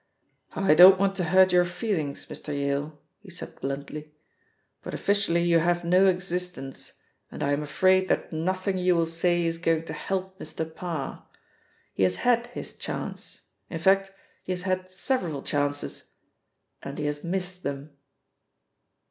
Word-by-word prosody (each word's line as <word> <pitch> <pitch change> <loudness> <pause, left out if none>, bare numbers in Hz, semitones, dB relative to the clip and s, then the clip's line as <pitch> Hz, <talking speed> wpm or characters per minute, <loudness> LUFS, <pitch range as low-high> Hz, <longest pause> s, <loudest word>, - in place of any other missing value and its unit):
"I 195 -5 +4
don't 185 +4 +9
want 195 0 +1
to 180 - 0
hurt 185 +2 +5
your 180 0 +5
feelings, 175 -5 -3
Mr. - - -9
Yale," 145 +1 -2 0.2
he 205 - -15
said 180 - -9
bluntly, 145 +2 -5 0.7
"but - - -6
officially 200 -4 +1
you 170 -1 +4
have 175 +1 +1
no 185 +3 +5
existence, 180 -6 -2 0.4
and - - -5
I 140 - +1
am 145 - 0
afraid 185 +6 +3
that - - -1
nothing 185 +4 -1
you 180 0 +3
will 165 -1 +2
say 170 +1 +1
is 165 0 -1
going 165 -1 +1
to - - -6
help 190 0 -4
Mr. 160 -1 -4
Parr. 165 -6 -5 0.7
He - - -4
has 95 -1 +3
had 240 -1 +2
his 245 - -7
chance - - -6 0.3
in 165 - -4
fact, 195 +3 +3 0.3
he 185 - -2
has 180 0 -4
had 185 -1 -1
several 185 - -2
chances, 145 0 -2 0.7
and 140 - -7
he 150 - -3
has 145 0 -3
missed 180 +1 -3
them." 140 0 -5
175 Hz, 155 wpm, -26 LUFS, 150-185 Hz, 0.7 s, don't